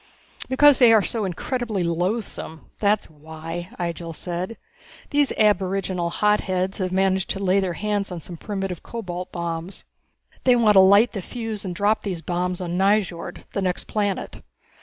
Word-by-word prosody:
"Because 280 +1 +6
they 245 -3 +7
are 220 -3 +6
so 220 0 -2
incredibly 215 +2 -2
loathsome, 175 -1 -3
that's 205 0 +2
why!" 160 +3 -8
Ihjel 170 -1 -4
said. 180 +7 -4 0.5
"These 290 -1 +3
aboriginal 190 -4 +1
hotheads 190 -1 0
have 185 -1 -1
managed 190 0 +1
to 195 - -2
lay 195 0 +2
their 185 -3 -1
hands 205 0 -2
on 175 - -4
some 170 +2 -9
primitive 195 -1 -4
cobalt 180 -6 -6
bombs. 170 +1 -4 0.6
They 250 -1 +5
want 225 -3 +5
to 195 - +7
light 200 +5 +6
the 200 - -4
fuse 225 +1 -5
and 180 -3 -4
drop 210 +3 +2
these 180 -5 -4
bombs 180 +1 -2
on 175 0 -2
Nyjord, 195 -3 0
the 200 - -2
next 180 -2 -1
planet. 205 -2 -2
190 Hz, 160 wpm, -23 LUFS, 175-210 Hz, 0.6 s, they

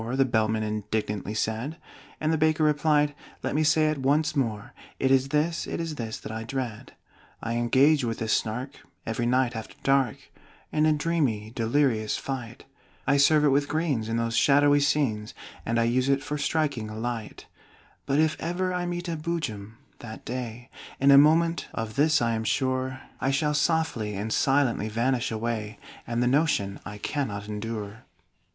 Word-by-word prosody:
The 135 0 +3
Bellman 110 -2 +1
indignantly 105 -1 -3
said. 115 +9 -2 0.4
And 155 +1 +1
the - - +2
Baker 155 0 +2
replied: 150 -1 +3 0.3
"Let - - -1
me 155 +2 +2
say 155 0 +3
it 150 - -4
once 150 +3 +1
more; 115 -3 -2 0.2
It 130 - +1
is 135 0 +4
this, 150 +4 0
it - - -4
is 165 -2 -3
this 115 -6 -5
that - - -7
I 110 0 -4
dread! 120 -2 -5 0.5
"I 115 - -2
engage 130 +5 +4
with 115 -1 -2
the 115 - -3
Snark 115 +5 -1 0.3
every 115 +1 -1
night 125 -1 +2
after 110 -1 -7
dark 135 -3 +2 0.5
In 155 0 +2
a - - +4
dreamy 145 -9 -1
delirious 115 -2 +1
fight; 120 -4 -6 0.4
I 140 0 +3
serve 150 +2 +5
it - - +5
with 140 +1 +2
greens 145 -8 -1
in 115 - 0
those 115 0 -1
shadowy 145 +2 +5
scenes, 130 -7 0 0.3
And 115 +1 +1
I - - +3
use 125 +3 +1
it 140 0 +2
for 145 - -3
striking 140 -8 -1
a 110 - -7
light: 115 -2 -5 0.6
"But 140 0 +1
if 155 0 +3
ever 185 +2 -1
I 180 0 -2
meet 175 0 -4
with 165 -2 -3
a - - -10
Boojum, 115 -11 -4 0.2
that 110 -1 -9
day, 125 0 -6 0.3
In 140 +1 +5
a 140 - +9
moment 165 +3 +3
(of 110 -1 -3
this 150 -1 +3
I 115 - +1
am 110 0 -2
sure), 130 +2 -1 0.2
I 135 - 0
shall 150 +2 +1
softly 150 -9 0
and 105 +3 -3
silently 135 -6 +2
vanish 120 +3 0
away 110 -1 -3 0.3
And 120 +1 0
the - - +2
notion 130 -8 +1
I 105 0 -7
cannot 105 -4 -3
endure!" 105 0 -5
130 Hz, 180 wpm, -26 LUFS, 110-150 Hz, 0.6 s, a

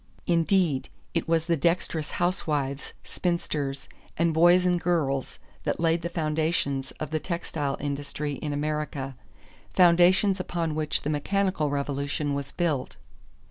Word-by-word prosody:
Indeed 170 -4 +2 0.2
it 165 - -1
was 165 -1 +2
the 170 0 +2
dexterous 165 0 0
housewives, 150 -6 -1
spinsters, 150 -6 -2 0.3
and 165 0 +2
boys 175 +3 +5
and 175 -1 +2
girls 145 -7 0 0.3
that - - -1
laid 165 0 +2
the 170 - -3
foundations 155 -4 0
of 155 -1 -6
the 155 - 0
textile 155 -5 -3
industry 145 +1 -3
in 150 - -4
America, 145 -2 -2 0.6
foundations 185 +3 +5
upon 170 -3 -2
which 155 0 0
the 150 - -1
mechanical 185 +1 0
revolution 140 +1 -1
was 140 0 -4
built. 155 -7 -1
155 Hz, 130 wpm, -27 LUFS, 145-175 Hz, 0.6 s, boys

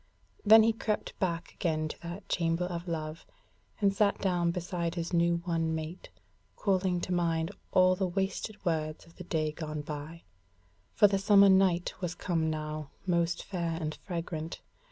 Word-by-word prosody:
Then 220 +1 +8
he 225 +1 +3
crept 215 -1 -2
back 175 -3 -2
again 155 -2 -1
to - - -9
that 170 +4 -7
Chamber 165 0 0
of 175 0 -5
Love, 160 -1 -4 0.6
and 200 -2 +3
sat 200 0 +2
down 175 -3 +1
beside 170 -1 -2
his 170 +1 -3
new 170 0 +2
won 165 -2 0
mate, 160 +3 -6 0.5
calling 185 -2 +1
to 180 - -2
mind 165 -2 0 0.2
all 185 0 +5
the 190 0 0
wasted 195 +3 -3
words 155 -2 -1
of 170 - -20
the 180 - -7
day 155 -3 0
gone 155 -1 -5
by; 150 +3 -7 0.7
for - - +6
the 195 -1 +1
summer 200 0 +6
night 190 -2 +3
was 180 -1 -2
come 165 -3 0
now, 155 -1 -4 0.2
most 170 -1 +1
fair 170 -4 -3
and 155 -2 -3
fragrant. 165 -3 -5
170 Hz, 165 wpm, -30 LUFS, 160-185 Hz, 0.7 s, Then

